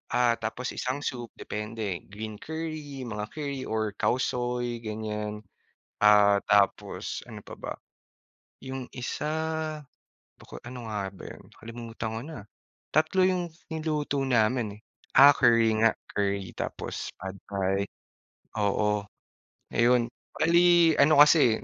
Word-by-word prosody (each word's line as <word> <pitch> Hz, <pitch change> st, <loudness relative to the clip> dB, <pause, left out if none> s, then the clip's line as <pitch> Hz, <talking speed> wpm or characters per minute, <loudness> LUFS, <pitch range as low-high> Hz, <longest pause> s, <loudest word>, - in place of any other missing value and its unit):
ah, 120 Hz, -1 st, +3 dB
tapos 115 Hz, +3 st, -3 dB
isang 130 Hz, +3 st, -3 dB
soup, 120 Hz, -4 st, -3 dB
depende. 105 Hz, -3 st, -4 dB
Green 105 Hz, +1 st, -7 dB
curry, 155 Hz, -4 st, -5 dB
mga 105 Hz, -3 st, -4 dB
curry 140 Hz, -3 st, -4 dB
or 110 Hz, -1 st, -1 dB
Khao -, -, +3 dB
Soi, 120 Hz, -1 st, -2 dB
ganyan, 105 Hz, -1 st, -4 dB, 0.6 s
ah, 105 Hz, -1 st, +6 dB
tapos 100 Hz, -2 st, +1 dB
ano -, -, -10 dB
pa -, -, -9 dB
ba? -, -, -5 dB, 0.8 s
Yung 130 Hz, -1 st, -7 dB
isa, 130 Hz, +4 st, -3 dB, 1.0 s
baka, -, -, -12 dB
ano 120 Hz, -2 st, -7 dB
nga 105 Hz, -2 st, -2 dB
ba -, -, -12 dB
'yon, -, -, -11 dB, 0.2 s
kalimutan 115 Hz, -1 st, -6 dB
ko -, -, -5 dB
na, 160 Hz, -1 st, -8 dB, 0.5 s
3 160 Hz, +5 st, +3 dB
yung 185 Hz, -1 st, +2 dB, 0.2 s
niluto 155 Hz, -3 st, -1 dB
namin 120 Hz, -1 st, +2 dB
eh, 105 Hz, -, -16 dB, 0.3 s
ah, 140 Hz, +1 st, +10 dB
curry 115 Hz, -5 st, +4 dB
nga, 115 Hz, 0 st, +4 dB, 0.2 s
curry 100 Hz, -2 st, -1 dB
tapos -, -, -5 dB
Pad 95 Hz, 0 st, -7 dB
Thai, 100 Hz, 0 st, 0 dB, 0.8 s
oo, 105 Hz, +1 st, +1 dB, 0.7 s
ayun, 120 Hz, 0 st, +4 dB, 0.3 s
bali 170 Hz, 0 st, +5 dB
ano 145 Hz, +2 st, +6 dB
kasi 145 Hz, -7 st, +4 dB
120 Hz, 125 wpm, -28 LUFS, 105-140 Hz, 1.0 s, ah